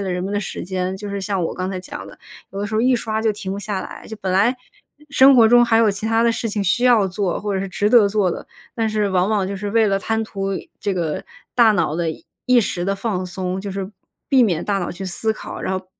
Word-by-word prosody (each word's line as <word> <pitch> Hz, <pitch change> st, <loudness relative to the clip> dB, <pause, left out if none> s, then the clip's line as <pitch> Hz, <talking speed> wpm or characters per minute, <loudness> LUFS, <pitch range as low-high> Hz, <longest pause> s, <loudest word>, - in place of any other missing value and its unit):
了 195 Hz, -2 st, -2 dB
人 180 Hz, 0 st, -2 dB
们 195 Hz, -, -3 dB
的 205 Hz, -, 0 dB
时 195 Hz, -, -5 dB
间， 185 Hz, +1 st, -2 dB
就 205 Hz, +1 st, -7 dB
是 200 Hz, 0 st, -3 dB
像 195 Hz, -2 st, -1 dB
我 -, -, -2 dB
刚 185 Hz, +1 st, -3 dB
才 190 Hz, -, -3 dB
讲 180 Hz, -, -8 dB
的。 -, -, -13 dB, 0.3 s
有 195 Hz, -, -7 dB
的 205 Hz, -, -2 dB
时 215 Hz, -, -5 dB
候 220 Hz, -, +2 dB
一 255 Hz, +1 st, +3 dB
刷 220 Hz, -2 st, -2 dB
就 220 Hz, -1 st, +2 dB
停 195 Hz, -2 st, -5 dB
不 200 Hz, -, -4 dB
下 205 Hz, -2 st, -3 dB
来， -, -, -10 dB
就 220 Hz, -, -8 dB
本 190 Hz, -1 st, -1 dB
来 215 Hz, +7 st, +3 dB, 0.5 s
生 270 Hz, -1 st, +7 dB
活 230 Hz, -, +7 dB
中 240 Hz, +2 st, +6 dB
还 235 Hz, -1 st, +3 dB
有 225 Hz, -2 st, +4 dB
其 200 Hz, +2 st, -4 dB
他 225 Hz, 0 st, +2 dB
的 235 Hz, 0 st, +3 dB
事 225 Hz, 0 st, -2 dB
情 205 Hz, -1 st, -2 dB
需 240 Hz, +7 st, +2 dB
要 235 Hz, -6 st, +5 dB
做， 185 Hz, -1 st, -2 dB
或 210 Hz, -, -2 dB
者 190 Hz, -, -1 dB
是 195 Hz, -, -4 dB
值 205 Hz, +3 st, 0 dB
得 230 Hz, -5 st, +6 dB
做 200 Hz, -3 st, +1 dB
的， -, -, -6 dB, 0.3 s
但 225 Hz, -1 st, 0 dB
是 210 Hz, -2 st, 0 dB
往 185 Hz, 0 st, +2 dB
往 210 Hz, -3 st, +1 dB
就 200 Hz, -, -4 dB
是 205 Hz, +1 st, -4 dB
为 220 Hz, +1 st, +3 dB
了 195 Hz, -1 st, +1 dB
贪 225 Hz, +3 st, -1 dB
图 195 Hz, -2 st, -3 dB, 0.3 s
这 200 Hz, -, -1 dB
个 165 Hz, -4 st, -2 dB, 0.3 s
大 235 Hz, -3 st, +6 dB
脑 165 Hz, -6 st, 0 dB
的 170 Hz, -1 st, 0 dB
一 160 Hz, -, -10 dB, 0.2 s
一 250 Hz, -1 st, +5 dB
时 175 Hz, -3 st, -2 dB
的 195 Hz, +1 st, 0 dB
放 195 Hz, -3 st, -2 dB
松， 185 Hz, +1 st, -4 dB
就 200 Hz, +1 st, -5 dB
是 195 Hz, 0 st, -4 dB, 0.4 s
避 265 Hz, -3 st, +4 dB
免 175 Hz, -7 st, +1 dB
大 200 Hz, -1 st, 0 dB
脑 175 Hz, -, -3 dB
去 190 Hz, +2 st, -7 dB
思 220 Hz, +4 st, -1 dB
考， -, -, -8 dB
然 190 Hz, -, -1 dB
后 185 Hz, -, -15 dB
200 Hz, 300 characters per minute, -21 LUFS, 190-220 Hz, 0.5 s, 生